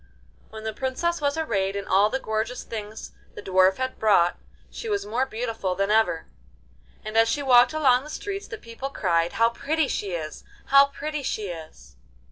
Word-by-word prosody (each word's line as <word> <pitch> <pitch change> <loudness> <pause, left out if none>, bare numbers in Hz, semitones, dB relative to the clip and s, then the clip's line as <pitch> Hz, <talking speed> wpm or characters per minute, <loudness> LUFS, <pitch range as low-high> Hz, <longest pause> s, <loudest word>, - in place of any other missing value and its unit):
When 220 0 -9
the 220 0 -3
Princess 270 +8 -2
was 285 +1 0
arrayed 200 -11 -1
in 200 -1 -3
all 200 +3 +4
the 265 - -1
gorgeous 220 +1 -3
things 215 -1 -7 0.2
the - - -7
Dwarf 190 0 +3
had 260 0 -3
brought, 195 -5 +3 0.3
she 455 - -6
was 405 -1 -1
more 245 +5 -1
beautiful 225 -6 -3
than 195 +2 0
ever, 195 -7 +2 0.8
and 215 0 -6
as 225 0 +5
she 285 - -1
walked 250 +1 +6
along 265 -5 +3
the 300 - -10
streets 395 +5 -5
the 440 - -7
people 235 - -7
cried: 170 -9 0
'How 230 0 +3
pretty 300 +5 0
she 200 -6 -3
is! 155 -2 -5 0.3
How 275 0 +7
pretty 300 +1 -5
she 215 -6 -3
is! 155 - -10
225 Hz, 185 wpm, -25 LUFS, 195-275 Hz, 0.8 s, How